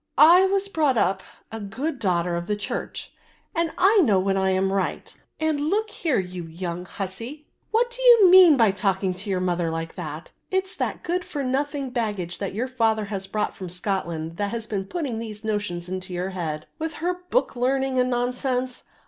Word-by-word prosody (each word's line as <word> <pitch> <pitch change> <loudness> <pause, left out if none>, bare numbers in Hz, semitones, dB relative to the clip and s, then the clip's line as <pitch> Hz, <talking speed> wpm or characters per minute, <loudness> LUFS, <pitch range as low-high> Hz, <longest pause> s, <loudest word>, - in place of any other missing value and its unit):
"I 345 +5 +8
was 395 +1 0
brought 300 -9 +1
up 190 -2 +2 0.3
a 225 - -5
good 255 +9 -4
daughter 175 -4 +1
of 170 +1 -4
the 210 - 0
church, 205 - -5 0.4
and 335 0 0
I 405 +4 +5
know 210 - +4
when 195 +1 +1
I 190 0 +2
am 190 +1 +1
right, 195 -2 -2 0.2
and 315 -2 +1
look 415 +9 0
here, 320 -9 0
you 180 -2 -3
young 175 +2 -5
hussie, 230 - -6 0.2
what 475 +2 +2
do - - -7
you 475 -5 +8
mean 360 -5 +8
by 225 -5 +5
talking 190 -1 0
to 190 +3 -7
your 190 -2 +1
mother 175 -2 0
like 165 0 -4
that? 155 -2 -7 0.2
It's 380 0 -1
that - - -2
good 360 +1 -1
for 285 -5 -4
nothing 275 +1 -1
baggage, 205 -8 -2
that 195 -1 -4
your 240 +4 -1
father 225 -4 +1
has 195 -1 -3
brought 210 +1 -2
from 185 -2 -7
Scotland, 170 -3 -3
that 205 -1 -1
has 230 +1 -4
been 200 -3 -3
putting 270 - -3
these 215 -2 -7
notions 205 -5 -2
into 185 0 -5
your 180 +2 -2
head, 155 -4 -4
with 320 0 -3
her 355 +2 -2
book - - +1
learning 265 +1 +1
and 250 0 +2
nonsense. 250 +1 -1
220 Hz, 195 wpm, -24 LUFS, 185-295 Hz, 0.4 s, I